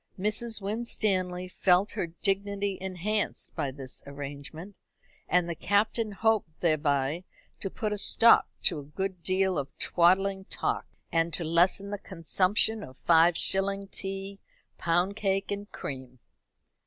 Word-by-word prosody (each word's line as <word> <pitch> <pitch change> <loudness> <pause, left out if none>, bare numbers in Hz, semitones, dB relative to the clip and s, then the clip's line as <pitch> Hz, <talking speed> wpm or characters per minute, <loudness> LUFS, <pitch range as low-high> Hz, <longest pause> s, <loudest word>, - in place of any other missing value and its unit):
Mrs. 215 +3 -2
Winstanley 195 -4 -1
felt 185 +2 +2
her 170 - -2
dignity 200 +3 -1
enhanced 190 +3 -2
by 140 - -1
this 130 -1 -5
arrangement, 145 +6 -8 0.5
and 180 -1 +3
the 170 - -2
Captain 210 +5 +1
hoped 210 -6 0
thereby 150 -1 +1 0.4
to 195 - -3
put 210 +2 -2
a 210 - -3
stop 230 +3 +6
to 165 -5 +3
a - - -8
good 185 +5 -4
deal 185 -1 +1
of 140 - -7
twaddling 190 +2 +3
talk, - - -2 0.2
and 165 0 +1
to 170 - -3
lessen 175 +5 +2
the 205 - -3
consumption 195 +4 +1
of 130 -7 -10
five 165 0 +4
shilling 195 +2 +1
tea, 195 +1 -6 0.4
pound 175 +4 +1
cake, 195 -2 -1
and 205 +1 -5
cream. 130 -2 -7
190 Hz, 135 wpm, -28 LUFS, 165-200 Hz, 0.5 s, stop